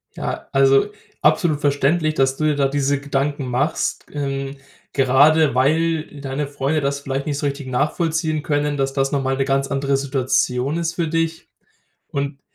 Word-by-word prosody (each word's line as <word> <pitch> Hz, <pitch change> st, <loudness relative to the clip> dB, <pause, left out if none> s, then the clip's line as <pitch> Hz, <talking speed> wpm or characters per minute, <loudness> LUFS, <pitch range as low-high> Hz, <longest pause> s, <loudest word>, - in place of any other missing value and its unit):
Ja, -, -, -5 dB
also 135 Hz, +6 st, +4 dB, 0.3 s
absolut 155 Hz, -1 st, +2 dB
verständlich, 155 Hz, +3 st, +1 dB
dass 135 Hz, 0 st, +2 dB
du 155 Hz, -, -4 dB
dir 150 Hz, -, +2 dB
da 140 Hz, -1 st, +2 dB
diese 140 Hz, 0 st, 0 dB
Gedanken 140 Hz, 0 st, -2 dB
machst. 130 Hz, +6 st, -1 dB
G -, -, -20 dB, 0.4 s
ähm, 140 Hz, -, -11 dB, 0.4 s
gerade 145 Hz, +3 st, +4 dB
weil 155 Hz, +3 st, +1 dB
deine 140 Hz, +1 st, -3 dB
Freunde 140 Hz, +2 st, -1 dB
das 140 Hz, 0 st, -1 dB
vielleicht 135 Hz, 0 st, -3 dB
nicht 145 Hz, -2 st, -2 dB
so 145 Hz, -, -3 dB
richtig 140 Hz, -1 st, -3 dB
nachvollziehen 155 Hz, +3 st, 0 dB
können, 145 Hz, -1 st, 0 dB
dass 135 Hz, -1 st, 0 dB
das 135 Hz, 0 st, 0 dB
noch 140 Hz, -1 st, +1 dB
mal 135 Hz, 0 st, 0 dB
'ne 135 Hz, -, +1 dB
ganz 135 Hz, 0 st, +1 dB
andere 140 Hz, 0 st, 0 dB
Situation 135 Hz, +1 st, 0 dB
ist 170 Hz, 0 st, -2 dB
für 170 Hz, -2 st, -1 dB
dich. 165 Hz, 0 st, -2 dB, 0.6 s
Und 140 Hz, 0 st, -3 dB
140 Hz, 170 wpm, -21 LUFS, 135-155 Hz, 0.6 s, also